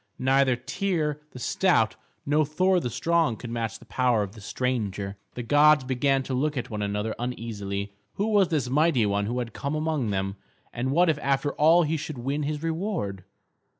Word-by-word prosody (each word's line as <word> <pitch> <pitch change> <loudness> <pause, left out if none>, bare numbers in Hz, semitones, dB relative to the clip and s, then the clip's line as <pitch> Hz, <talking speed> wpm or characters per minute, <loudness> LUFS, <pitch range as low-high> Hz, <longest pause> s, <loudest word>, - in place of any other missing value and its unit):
Neither 130 -1 +3
Tŷr 155 -4 -1
the - - -12
stout 125 - +2 0.3
nor 150 +2 +3
Thor 180 +5 +2
the 125 - -3
strong 165 0 +1
could 120 - -7
match 115 -1 -3
the - - -17
power 125 -4 +1
of 100 - -6
the 110 0 -13
stranger. 105 -4 -2 0.2
The 120 - -4
gods 145 +3 +5
began 135 +1 +1
to 130 - -4
look 145 +3 0
at 125 0 -4
one 105 -1 -3
another 105 +2 -1
uneasily. 105 -5 -4 0.2
Who 200 - -1
was 205 -3 +4
this 150 -6 0
mighty 140 -3 +3
one 100 0 0
who 120 +3 -2
had 120 -3 -3
come 140 +2 -3
among 155 -6 -1
them, 95 0 -2 0.4
and 125 +2 -2
what 175 +6 +4
if 155 -3 +1
after 140 0 0
all 165 +3 +5
he 160 +1 0
should 150 -1 -6
win 135 +5 -2
his 150 +1 -3
reward? 160 - -3
130 Hz, 190 wpm, -26 LUFS, 115-155 Hz, 0.4 s, gods